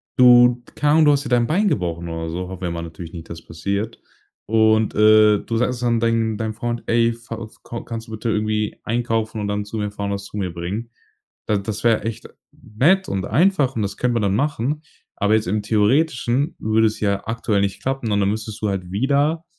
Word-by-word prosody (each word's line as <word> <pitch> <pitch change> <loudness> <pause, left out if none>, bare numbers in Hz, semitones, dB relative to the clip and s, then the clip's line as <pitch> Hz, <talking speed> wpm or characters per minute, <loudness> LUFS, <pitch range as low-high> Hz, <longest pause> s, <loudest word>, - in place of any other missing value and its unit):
du- 125 -1 +6
keine 145 0 +2
Ahnung- 160 0 +5
du 150 - +6
hast 140 0 +1
dir - - -4
dein 120 -2 +3
Bein 200 +7 +2
gebrochen 85 - -1
oder 80 0 -4
so- 90 +2 -4
hoffen 95 -1 -8
wir 90 - -2
ja - - -4
mal 85 0 -4
natürlich 80 0 -9
nicht, 85 -2 -9
dass 85 - -7
es - - -30
passiert- 100 +6 -3 0.5
und, 110 0 +3
äh, 105 -1 +6
du 115 +2 -3
sagst 125 +1 0
dann 120 -1 +1
deinen 115 -2 +1
deinem 110 0 -3
Freund: 120 +1 -4
„Ey, 115 0 +3
fa 115 -1 -8
f 110 - -12
ko 115 - -7
kannst 115 0 -7
du - - -11
bitte 110 +2 -3
irgendwie 110 0 -1
einkaufen 115 -2 -1
und 105 - -2
dann 105 0 -2
zu 110 +2 -6
mir 105 -1 -2
fahren, 100 0 -4
was 100 0 -4
zu 105 - -8
mir 90 -4 -2
bringen?" 95 +7 -5 0.6
Da 105 - +2
das 105 +2 -4
wär 115 -2 +2
echt 115 -1 -5 0.3
nett 170 - +1
und 95 -1 -2
einfach 145 - +2
und 115 - -1
das 100 - -4
können 125 -1 0
wir 115 - +1
dann 100 -1 +1
machen. 145 +1 -1 0.4
Aber 105 +2 +2
jetzt 110 -4 0
im 105 +2 0
Theoretischen 125 +6 +1
würde 110 +1 +2
es 110 - -4
ja 100 -1 0
aktuell 110 -3 0
nicht 100 0 -2
klappen, 130 -2 -2
und 100 - +2
dann 100 - +2
müsstest 110 0 -4
du 105 - 0
halt 90 -2 -4
wieder 145 - +1
110 Hz, 230 wpm, -21 LUFS, 100-120 Hz, 0.6 s, du